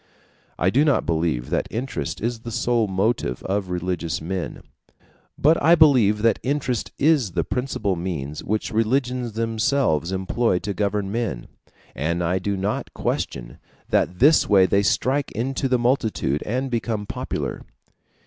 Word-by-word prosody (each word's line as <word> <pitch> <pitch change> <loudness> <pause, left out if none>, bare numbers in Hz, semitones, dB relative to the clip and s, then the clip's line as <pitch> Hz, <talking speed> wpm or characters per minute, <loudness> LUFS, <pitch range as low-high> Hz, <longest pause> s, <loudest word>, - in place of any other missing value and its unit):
I 95 - +2
do 140 +7 +4
not 145 -3 +2
believe 80 -7 -1
that - - 0
interest 125 +4 -4
is 115 +1 -2
the 115 - -8
sole 115 0 +1
motive 95 - -1
of 95 -1 -2
religious 90 -2 -2
men: 90 +2 -5 0.7
but 155 +3 +3
I 170 +2 +6
believe 125 -10 +4
that 115 -3 +3
interest 130 -3 -1
is 140 - +2
the 85 - 0
principal 105 - -2
means 80 -4 -4
which 110 +1 -2
religions 120 +1 0
themselves 110 - 0
employ 95 +2 0
to 100 +2 -3
govern 100 -1 -1
men, 110 - -3 0.4
and 85 +4 -1
I 90 +2 +1
do 100 +1 -2
not 100 +3 -3
question - - -3 0.3
that 90 - +1
this 145 - +5
way 95 -3 +6
they 100 +2 +2
strike 135 +7 +1
into 135 +4 -2
the 125 - +3
multitude 115 - 0
and 130 +4 -2
become 115 -3 -2
popular. - - -4
105 Hz, 150 wpm, -23 LUFS, 90-125 Hz, 0.7 s, I